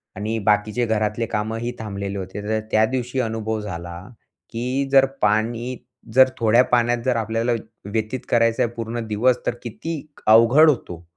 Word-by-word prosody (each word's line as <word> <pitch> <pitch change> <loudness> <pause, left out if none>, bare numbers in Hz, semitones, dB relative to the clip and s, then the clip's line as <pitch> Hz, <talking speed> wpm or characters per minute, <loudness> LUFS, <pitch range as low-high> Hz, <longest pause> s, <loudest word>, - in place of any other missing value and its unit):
आणि 110 +3 -3
बाकीचे 105 +3 +1
घरातले 110 0 0
कामंही 115 +3 -3
थांबलेले 100 -2 -5
होते, 95 +2 -6
तर 110 +1 -1
त्या 110 0 +4
दिवशी 125 +1 -3
अनुभव 110 -1 -2
झाला, 85 -3 -6 0.5
की 125 +4 -2
जर 135 -1 +6 0.2
पाणी 115 +4 0 0.4
जर 130 0 +7
थोड्या 115 +2 +5
पाण्यात, 120 0 +3
जर 125 -2 +2
आपल्याला 115 +2 -1
व्य 115 - -3 0.3
व्यतीत 110 +3 -2
करायचं 115 -1 +3
आहे 120 - -1
पूर्ण 115 0 -4
दिवस 120 +4 +2
तर 120 - 0
किती 160 +8 -5 0.3
अवघड 115 +8 +7
होतो. 90 - -3
115 Hz, 155 wpm, -22 LUFS, 105-120 Hz, 0.5 s, जर